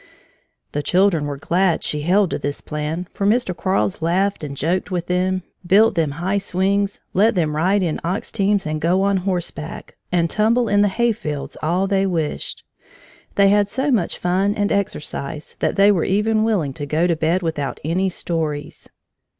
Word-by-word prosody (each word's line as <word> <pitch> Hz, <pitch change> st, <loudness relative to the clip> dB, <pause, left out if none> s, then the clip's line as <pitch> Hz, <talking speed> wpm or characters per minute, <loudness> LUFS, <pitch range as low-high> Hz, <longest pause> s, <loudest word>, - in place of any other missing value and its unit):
The 145 Hz, -, -2 dB
children 175 Hz, -2 st, +2 dB
were 145 Hz, -1 st, -4 dB
glad 175 Hz, +4 st, +1 dB
she 150 Hz, -, -2 dB
held 185 Hz, +4 st, +2 dB
to -, -, -2 dB
this 145 Hz, 0 st, -3 dB
plan, 155 Hz, +4 st, -4 dB
for -, -, -4 dB
Mr. 215 Hz, -4 st, +1 dB
Quarles 165 Hz, -, 0 dB
laughed 185 Hz, +3 st, 0 dB
and 140 Hz, -2 st, -6 dB
joked 175 Hz, +8 st, -1 dB
with 175 Hz, -3 st, -2 dB
them, 185 Hz, +1 st, 0 dB, 0.2 s
built 200 Hz, +5 st, +5 dB
them 160 Hz, -4 st, 0 dB
high 185 Hz, +6 st, -1 dB
swings, 200 Hz, +1 st, 0 dB
let 215 Hz, +4 st, +3 dB
them 155 Hz, -4 st, 0 dB
ride 190 Hz, +5 st, +2 dB
in 165 Hz, -3 st, -1 dB
ox 180 Hz, +5 st, -2 dB
teams 200 Hz, -2 st, +1 dB
and 155 Hz, 0 st, -3 dB
go 180 Hz, +4 st, +2 dB
on 200 Hz, 0 st, +2 dB
horseback, 175 Hz, -4 st, -4 dB, 0.2 s
and 170 Hz, -2 st, +2 dB
tumble 225 Hz, +6 st, +2 dB
in 205 Hz, -1 st, +3 dB
the 205 Hz, -, +4 dB
hayfields 195 Hz, -9 st, -2 dB
all 175 Hz, +5 st, +1 dB
they 195 Hz, 0 st, +1 dB
wished. 165 Hz, -5 st, -3 dB, 0.7 s
They 200 Hz, -1 st, +5 dB
had 205 Hz, 0 st, +3 dB
so 265 Hz, +7 st, -1 dB
much 205 Hz, -9 st, 0 dB
fun 190 Hz, +3 st, +1 dB
and 205 Hz, -1 st, 0 dB
exercise 155 Hz, -6 st, -3 dB
that -, -, 0 dB
they 200 Hz, +1 st, +6 dB
were 180 Hz, -5 st, +1 dB
even 215 Hz, +3 st, +1 dB
willing 190 Hz, -12 st, 0 dB
to 145 Hz, +2 st, -6 dB
go 155 Hz, +4 st, +1 dB
to 170 Hz, -2 st, +2 dB
bed 165 Hz, +4 st, 0 dB
without 145 Hz, -6 st, -3 dB
any 180 Hz, +5 st, 0 dB
stories. 155 Hz, -5 st, -4 dB
180 Hz, 180 wpm, -21 LUFS, 160-200 Hz, 0.7 s, they